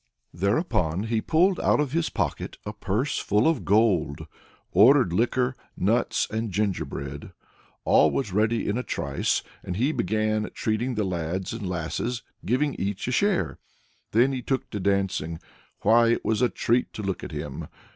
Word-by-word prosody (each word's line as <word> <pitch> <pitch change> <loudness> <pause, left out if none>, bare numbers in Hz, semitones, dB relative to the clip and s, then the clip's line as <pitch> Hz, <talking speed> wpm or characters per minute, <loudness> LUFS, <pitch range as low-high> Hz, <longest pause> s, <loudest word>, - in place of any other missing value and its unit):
Thereupon 100 - 0
he 110 0 0
pulled 180 - +2
out - - +3
of 150 -3 0
his 165 +2 0
pocket 85 -8 -3
a - - -4
purse 110 +9 -1
full 105 +6 +2
of 160 -6 +1
gold, 100 -9 +2 0.5
ordered 115 0 +6
liquor, 125 +5 +1 0.2
nuts 115 +6 +1
and 110 +1 -2
gingerbread. 85 -8 -3 0.5
All 75 - +5
was 70 +7 -2
ready 110 +3 +1
in 105 +4 0
a - - -3
trice, - - -1 0.2
and 90 - -4
he 130 +7 +2
began 110 - 0
treating 115 +3 -1
the 105 - 0
lads 90 +1 -3
and 110 -5 -4
lasses, 90 +8 -3 0.2
giving 130 +7 +1
each 100 +2 -2
a - - 0
share. 200 +6 +1 0.5
Then 120 +5 +3
he 130 -2 -3
took 130 +1 -2
to 105 - -3
dancing. 95 -4 0 0.4
Why, 115 +1 +5
it - - -3
was 110 +1 +1
a 125 - +4
treat 120 +1 0
to 105 - -6
look 95 -2 -3
at - - -6
him! - - -5
110 Hz, 165 wpm, -26 LUFS, 95-125 Hz, 0.5 s, ordered